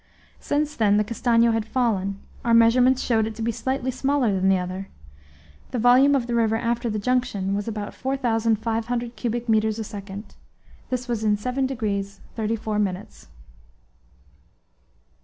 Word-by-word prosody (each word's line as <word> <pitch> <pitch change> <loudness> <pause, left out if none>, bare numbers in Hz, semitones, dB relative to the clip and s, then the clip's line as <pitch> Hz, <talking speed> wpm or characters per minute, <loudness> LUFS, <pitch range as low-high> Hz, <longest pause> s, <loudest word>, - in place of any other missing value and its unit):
Since 300 +1 -1
then 205 -2 +3
the 210 - +3
Castanho 230 +1 +2
had 225 -1 0
fallen; 210 -5 -1 0.2
our 235 -1 +3
measurements 245 +3 +5
showed 220 -3 +2
it 220 - -6
to 225 - -5
be 235 - +1
slightly 260 +2 -2
smaller 265 -3 +1
than 190 0 +2
the 190 - +4
other; 185 +2 -5 0.8
the 255 - -3
volume 250 +4 +5
of 255 -4 0
the 240 - -3
river 225 -2 +2
after 235 +1 -1
the 215 - -2
junction 210 -4 0
was 205 +1 -2
about 210 -2 -4
4,500 235 -2 -1
cubic 240 0 -3
metres 220 -1 +2
a 225 - -3
second. 205 0 -8 0.6
This 250 0 -3
was 235 -3 -2
in 210 -1 +2
7 255 +5 -1
degrees 205 -6 -3 0.2
34 220 -1 -2
minutes. 195 -1 -4
225 Hz, 155 wpm, -24 LUFS, 210-245 Hz, 0.8 s, measurements